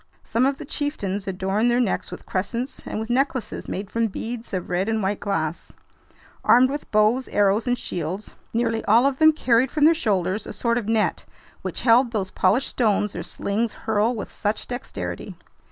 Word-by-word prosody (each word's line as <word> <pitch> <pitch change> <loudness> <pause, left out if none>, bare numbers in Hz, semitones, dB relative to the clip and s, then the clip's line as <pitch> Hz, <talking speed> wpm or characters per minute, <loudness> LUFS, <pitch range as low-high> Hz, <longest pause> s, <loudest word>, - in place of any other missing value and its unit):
Some 235 +4 +2
of 275 0 -1
the - - -8
chieftains 205 -11 -3
adorned 195 +4 0
their 240 +1 +3
necks 235 -6 0
with - - -9
crescents 230 +8 -3
and - - -3
with 225 +2 -4
necklaces 260 -1 -1
made 195 +1 -5
from 230 0 +1
beads 225 +3 -6
of 185 -2 -3
red 185 +4 0
and 220 -2 0
white 195 +1 0
glass. 170 -5 -3 0.7
Armed 255 +2 +6
with 290 +1 -5
bows, 215 +5 +3
arrows, 205 +3 +2
and 245 0 +2
shields, 180 +1 -5 0.2
nearly 225 -1 0
all 230 +5 +5
of 275 -1 +1
them 315 0 +7
carried 255 -4 +2
from 300 +1 +2
their 325 - +7
shoulders 205 - 0
a - - -6
sort 235 +3 0
of 210 - -7
net, 225 -1 +1 0.4
which - - -4
held 245 +1 +5
those 200 -5 -2
polished 205 +9 +2
stones 210 -3 +1
their 175 - -4
slings 200 +6 -2
hurl 220 +2 0
with 210 - -6
such 210 +1 -2
dexterity. 245 +1 -5
225 Hz, 185 wpm, -24 LUFS, 200-245 Hz, 0.7 s, them